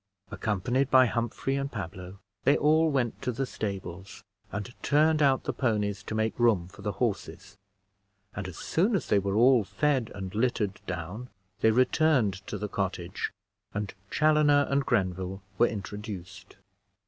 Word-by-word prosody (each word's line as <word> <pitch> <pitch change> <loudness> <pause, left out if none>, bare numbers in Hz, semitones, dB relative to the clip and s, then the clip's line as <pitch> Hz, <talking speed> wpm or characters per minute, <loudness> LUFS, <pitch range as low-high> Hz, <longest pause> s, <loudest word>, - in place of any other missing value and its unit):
Accompanied 120 +6 0
by 130 -1 +7
Humphrey 120 +3 -1
and 140 0 -2
Pablo, 95 -2 -7 0.3
they 140 - +4
all 160 +2 +4
went 130 -6 -1
to 125 - -1
the 135 +3 -2
stables, 95 -5 -6 0.3
and 105 +4 -5
turned 155 +1 +3
out 135 -2 +3
the - - -2
ponies 105 -5 0
to 110 - -5
make 110 +2 -1
room 110 -8 +3
for 100 +2 -14
the 105 0 -2
horses; 95 -3 -3 0.8
and 100 -2 -4
as 95 - -8
soon 200 +7 +1
as 190 - -1
they 100 - +4
were 100 0 -2
all 120 +1 +5
fed 135 +1 0
and 95 -2 -6
littered 105 -4 0
down, 90 +8 -5 0.3
they 110 - +4
returned 130 - +3
to - - -4
the 105 - -3
cottage, 95 -2 -3 0.4
and 100 -1 -3 0.2
Chaloner 150 -2 +4
and 140 0 +1
Grenville 95 -3 -1 0.2
were 120 - +6
introduced. 100 -2 -7
110 Hz, 155 wpm, -28 LUFS, 95-135 Hz, 0.8 s, by